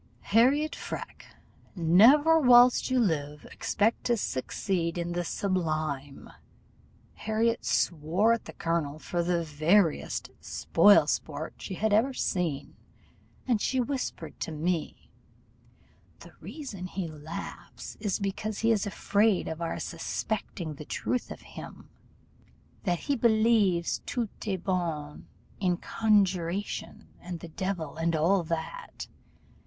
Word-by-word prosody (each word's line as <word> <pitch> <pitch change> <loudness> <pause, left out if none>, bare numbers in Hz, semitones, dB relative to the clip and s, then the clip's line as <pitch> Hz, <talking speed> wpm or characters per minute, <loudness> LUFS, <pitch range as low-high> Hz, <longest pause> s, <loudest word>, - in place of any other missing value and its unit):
Harriot 275 +7 +4
Freke, - - -7 0.5
never 240 - +6
whilst 245 -3 +6
you 255 0 +2
live 150 -8 -1
expect 220 +3 0
to 240 -1 +2
succeed 170 +2 -2
in 170 0 -2
the 175 0 -1
sublime.' 155 -7 -2 0.9
Harriot 225 +2 0
swore 175 +8 +2
at 230 - -3
the - - -9
colonel 165 -3 -2
for 175 +2 -2
the 170 0 0
veriest 160 +3 +1
spoil 200 +5 +4
sport - - -3
she 190 - -6
had 215 +2 0
ever 250 +5 +3
seen, 165 - -2 0.7
and 235 -5 +2
she 260 - 0
whispered 260 +1 -3
to - - -4
me 160 +1 -3 1.1
'The - - -12
reason 205 - -7
he 185 -1 -4
laughs 155 +1 -8
is 205 -4 -1
because 205 +1 -3
he 230 +1 +2
is 215 -2 +1
afraid 205 0 +1
of 160 +1 -5
our 165 - -2
suspecting 190 -7 -4
the 150 - -9
truth 250 +10 -2
of - - -8
him, - - -11 1.0
that 175 -3 0
he 285 - 0
believes 220 -7 +2
tout 235 -4 -2
de 200 -3 -2
bon 165 -5 -3 0.3
in 180 -3 +1
conjuration, 195 -3 0
and 175 -1 -7
the 170 - -9
devil, 165 -3 -4
and 165 0 0
all 175 +5 +3
that. 170 - -5
185 Hz, 125 wpm, -28 LUFS, 165-220 Hz, 1.1 s, never